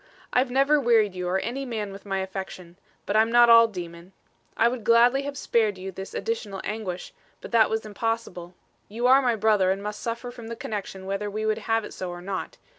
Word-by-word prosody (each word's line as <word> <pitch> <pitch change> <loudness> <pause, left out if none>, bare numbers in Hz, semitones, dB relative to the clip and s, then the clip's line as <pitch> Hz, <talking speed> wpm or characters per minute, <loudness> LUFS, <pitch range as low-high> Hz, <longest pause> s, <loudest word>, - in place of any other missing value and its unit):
I've 250 +1 +2
never 275 +4 +3
wearied 225 -5 +3
you 180 -1 -4
or 185 - +1
any 245 +7 -3
man 220 -6 -4
with 195 +1 -11
my 195 -1 -1
affection; 190 -2 -7 0.3
but 200 - -2
I'm 220 +1 +4
not 240 0 +6
all 230 0 +8
demon. 175 -2 -9 0.4
I 230 - +4
would 240 -1 -3
gladly 240 +4 +5
have 280 0 -5
spared 215 -6 +1
you 190 +1 -6
this 190 +1 -8
additional 220 -4 -3
anguish; 195 -4 -5 0.3
but - - -10
that 225 -2 +4
was 220 0 -2
impossible. 210 -5 -4 0.3
You 230 +4 -4
are 265 +2 +6
my 245 -3 +1
brother 210 -3 +3
and 195 +1 -1
must 210 0 -5
suffer 235 +1 -4
from 240 -2 -10
the 230 - -5
connection 195 -4 -6
whether 195 +2 -3
we 215 +2 -3
would 215 0 0
have 225 -1 +2
it - - -9
so 185 - -5
or 175 0 -7
not. 190 0 -5
215 Hz, 215 wpm, -25 LUFS, 190-235 Hz, 0.4 s, all